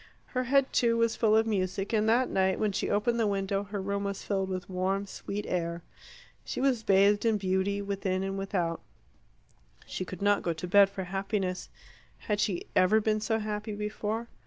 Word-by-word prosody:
Her 255 -1 0
head, 275 +1 +2
too, 230 -2 +3
was 230 -1 +2
full 220 -1 +3
of 220 - +3
music, 195 -1 -1
and 215 0 +2
that 245 +3 +3
night 190 0 +1
when 215 -1 +1
she - - -2
opened 235 +3 +1
the 225 - +2
window 195 0 -1
her 205 0 -5
room 200 +1 -2
was 200 -1 -4
filled 195 -2 -1
with 185 -1 -4
warm, 190 +2 -1
sweet 200 +1 -5
air. 170 -1 -2 0.6
She - - -5
was 260 -3 +2
bathed 200 0 +4
in 225 -2 +3
beauty 195 +1 0
within 195 -1 -1
and 195 0 -3
without; 185 -4 -2 1.0
she - - -4
could 185 +1 -7
not 205 0 +3
go 170 - -1
to 165 +3 -6
bed 200 +1 +6
for 195 -1 -5
happiness. 195 0 -2 0.5
Had 210 -1 -2
she 190 -4 0
ever 185 +4 +5
been 215 0 0
so 220 +1 0
happy 215 0 -4
before? 210 +2 -3
200 Hz, 190 wpm, -29 LUFS, 190-215 Hz, 1.0 s, bed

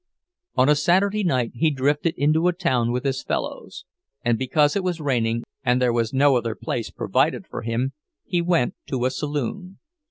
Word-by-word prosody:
On 130 - +4
a 150 - +6
Saturday 195 +7 +2
night 130 -9 +1
he 155 +6 +2
drifted 145 +3 0
into 155 +4 +2
a 180 - +3
town 130 -10 0
with 125 +1 -2
his 135 -1 -1
fellows; - - -4 0.4
and 120 -1 +3
because 145 +4 +2
it 200 - 0
was 180 -2 -1
raining, 115 -5 0 0.2
and 125 -2 +2
there 125 -2 +2
was 115 -1 0
no 135 0 +4
other 115 -2 -2
place 115 - -4
provided 135 - 0
for - - -6
him, 120 +4 -2 0.3
he 175 - 0
went 170 -7 +1
to 125 -2 -1
a 130 - +1
saloon. 150 - -4
135 Hz, 185 wpm, -23 LUFS, 125-165 Hz, 0.4 s, a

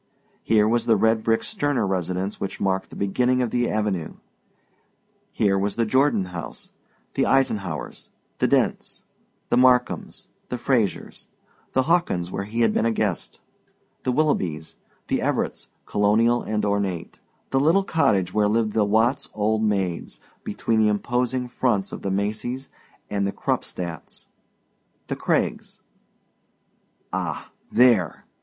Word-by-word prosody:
Here 110 -1 +3
was 115 +1 +1
the 115 - +5
red 110 +2 +3
brick 115 0 +1
Sterner 145 - 0
residence 95 +1 -2
which 100 - -4
marked 95 0 0
the - - -11
beginning 125 +6 +1
of 120 - -2
the 120 -1 +1
avenue; 105 -6 -1 1.2
here 95 -2 +2
was 100 +1 -1
the 115 - +1
Jordon 130 -3 +2
house, 85 -2 -7 0.4
the - - +1
Eisenhaurs', 100 - -1 0.3
the - - +3
Dents', - - 0 0.5
the - - +3
Markhams', 125 -1 +2 0.2
the - - -2
Frasers'; 120 -5 -1 0.5
the 130 - +3
Hawkins', 140 - +1
where 100 - -3
he 115 +3 -2
had 110 -2 +3
been 115 - +2
a - - +2
guest; 105 -5 -2 0.6
the 130 - 0
Willoughbys', 90 - 0 0.3
the - - 0
Everett's, - - -2 0.2
colonial 110 +4 +3
and 105 -1 -1
ornate; 100 -4 -2 0.3
the 135 - +3
little 165 +8 +4
cottage 100 - +1
where 105 -1 +3
lived 110 -1 +1
the 110 - +3
Watts 110 +5 +2
old 110 +1 +1
maids 95 -5 -1 0.2
between 115 -1 0
the 110 - +4
imposing 125 +4 0
fronts 120 -5 0
of - - -7
the 100 - -2
Macys' 110 +7 -2 0.4
and 100 -1 0
the - - -1
Krupstadts'; 85 -4 -4 0.8
the - - -3
Craigs - - -1 1.3
Ah... - - -3 0.2
THERE! 115 -10 +3
110 Hz, 135 wpm, -24 LUFS, 100-125 Hz, 1.3 s, the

